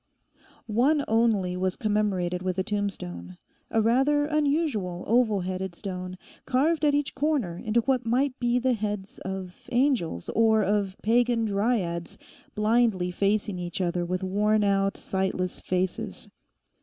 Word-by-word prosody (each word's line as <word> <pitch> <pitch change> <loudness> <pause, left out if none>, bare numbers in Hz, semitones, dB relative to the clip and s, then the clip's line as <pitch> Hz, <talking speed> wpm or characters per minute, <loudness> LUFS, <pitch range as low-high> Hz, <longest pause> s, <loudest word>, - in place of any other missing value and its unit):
One 270 +7 +2
only 220 -5 +2
was 185 0 -1
commemorated 195 -5 0
with 185 0 -2
a 190 - +1
tombstone, 90 - -4 0.3
a 225 -1 +2
rather 270 +6 +3
unusual 285 - 0
oval 220 -3 +2
headed 185 0 -4
stone, 185 -1 -6 0.3
carved 300 +6 +2
at 290 -1 +4
each 290 -1 -1
corner 270 - 0
into 220 +2 +2
what 255 0 +1
might 255 +3 0
be 240 0 +1
the 255 +1 +2
heads 210 -3 -4
of 190 -1 -7
angels, 240 - +1
or 220 -1 +3
of 200 -1 0
pagan 235 +1 +2
dryads, 200 -5 -1 0.4
blindly 210 -4 +2
facing 200 0 0
each 175 0 -4
other 175 -1 0
with 180 +2 -2
worn 210 +3 +2
out, 195 -1 +1
sightless 190 -1 -2
faces. 185 0 -2
210 Hz, 135 wpm, -26 LUFS, 185-240 Hz, 0.4 s, at